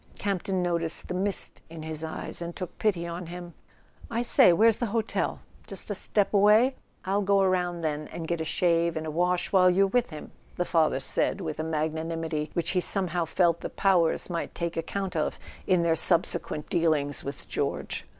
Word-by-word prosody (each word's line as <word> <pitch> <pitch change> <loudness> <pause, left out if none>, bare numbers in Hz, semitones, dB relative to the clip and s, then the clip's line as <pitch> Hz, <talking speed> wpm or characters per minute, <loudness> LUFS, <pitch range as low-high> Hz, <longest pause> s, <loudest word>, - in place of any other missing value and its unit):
Campton 195 -1 -1
noticed 170 -2 -2
the - - -2
mist 195 +1 -1
in 165 -1 -9
his 160 0 -4
eyes, 160 +2 -5
and 170 0 -5
took 185 -3 -6
pity 185 -6 +1
on 170 +1 -6
him. 175 0 -8 0.6
"I 235 +1 -1
say—where's 220 0 +5
the 240 - 0
hotel? 225 +1 -2 0.3
Just - - -7
a - - +1
step 205 -1 0
away? 210 +6 +5 0.3
I'll 195 +2 +1
go 200 0 +3
around, 180 -2 0
then, 150 -1 -2
and 165 - -6
get 170 -1 -1
a - - 0
shave 170 0 +1
and 160 - -4
a 155 - -3
wash 180 +2 0
while 185 -2 +5
you're 190 +2 +4
with 245 +5 +1
him," 155 -3 -9 0.2
the 180 - -1
father 160 -5 +2
said, 135 - -1
with 160 -5 -5
a - - -1
magnanimity 160 0 -2
which 170 -1 0
he 185 - +1
somehow 180 -3 +1
felt 170 +1 +1
the - - -4
powers 180 -4 +2
might 170 -2 -4
take 170 -1 -3
account 185 +3 -3
of 155 - -1 0.3
in 180 -3 +3
their 165 -1 +2
subsequent 165 -3 +2
dealings 150 -5 0
with 140 -2 -7
George. - - -3
170 Hz, 190 wpm, -27 LUFS, 160-190 Hz, 0.6 s, say—where's